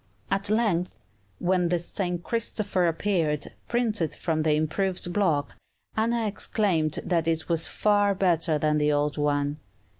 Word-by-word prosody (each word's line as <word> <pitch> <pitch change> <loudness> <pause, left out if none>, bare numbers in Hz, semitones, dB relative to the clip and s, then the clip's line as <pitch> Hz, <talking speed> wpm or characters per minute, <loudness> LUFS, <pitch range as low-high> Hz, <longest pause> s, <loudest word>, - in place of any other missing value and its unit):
At 195 0 0
length, 180 - 0 0.3
when 180 -1 +1
the 175 - +2
"St. 175 0 -3
Christopher" 210 -5 0
appeared, 165 -4 0 0.2
printed 220 -9 0
from 160 -3 -1
the 155 -1 +2
improved 175 +3 -1
block, 165 -8 +1 0.4
Anna 230 +1 +1
exclaimed 195 -6 0
that 165 -3 +1
it 160 -1 0
was 165 -1 +2
far 205 -1 +2
better 170 -4 +2
than 150 0 +1
the 150 0 +2
old 145 0 0
one. 145 0 0
175 Hz, 140 wpm, -26 LUFS, 155-200 Hz, 0.4 s, the